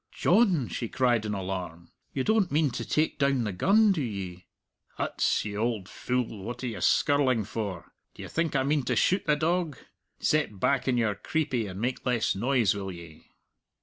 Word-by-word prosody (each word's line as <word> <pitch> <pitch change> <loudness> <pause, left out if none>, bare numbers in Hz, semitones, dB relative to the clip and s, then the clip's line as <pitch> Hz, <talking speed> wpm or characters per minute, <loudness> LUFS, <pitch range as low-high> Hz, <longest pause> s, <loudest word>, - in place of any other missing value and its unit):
"John!" 180 - +3
she 115 - -4
cried 120 -4 +1
in 105 - -2
alarm, 90 -3 -5 0.2
"you 130 - -1
don't 220 -2 +2
mean 150 -1 +2
to 120 - -4
take 155 +6 0
down 140 -3 +2
the 105 - -2
gun, 205 - +4
do 175 -6 0
ye?" 95 -7 -5 0.5
"Huts, - - 0
you 105 -1 -4
auld 110 -4 -1
fule, 125 -5 -3
what 120 +5 -6
are - - -1
you 115 - -5
skirling 130 -6 +3
for? 100 -5 -5 0.2
D'ye - - -8
think 165 -3 -1
I 135 - +3
mean 145 +2 +1
to - - 0
shoot 185 +2 +2
the 150 - +4
dog? 165 -2 0 0.4
Set 150 -10 0
back 135 +5 +1
on 125 -2 +2
your 110 -3 +2
creepie 125 -1 -1
and 95 +1 -7
make 125 +3 -2
less 125 -3 +1
noise, 120 -1 +2
will 100 -1 -5
ye?" 85 -3 -12
120 Hz, 185 wpm, -28 LUFS, 100-145 Hz, 0.5 s, gun